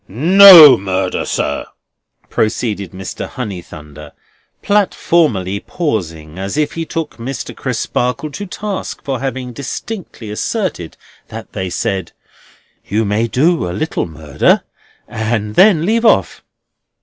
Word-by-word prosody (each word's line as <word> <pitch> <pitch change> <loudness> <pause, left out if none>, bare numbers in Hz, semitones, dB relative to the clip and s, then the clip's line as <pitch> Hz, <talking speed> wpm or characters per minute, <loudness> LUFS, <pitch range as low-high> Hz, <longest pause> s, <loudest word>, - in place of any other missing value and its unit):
NO 170 - +9
murder, 95 -1 -2
sir!" - - -2 0.6
proceeded 110 -3 -2
Mr. 95 0 -7
Honeythunder, 80 - -9 0.5
platformally 155 - +1
pausing 85 - -4
as 95 +8 -4
if 150 -1 0
he 165 -1 -5
took 165 -1 -5
Mr. 120 +1 -6
Crisparkle 125 +5 -2
to 205 +7 -7
task 200 +1 -5
for 135 -3 -3
having 130 -2 -4
distinctly 140 - -7
asserted 150 - -3 0.3
that - - -10
they 95 -1 -4
said: 95 -1 -3 0.7
You 110 +3 -1
may 105 +3 0
do 145 - +1
a - - -4
little 155 - -2
murder, 80 -2 0 0.4
and 110 -2 -3
then 185 - +4
leave 225 +4 +1
off. 225 - +2
120 Hz, 115 wpm, -16 LUFS, -, 0.7 s, NO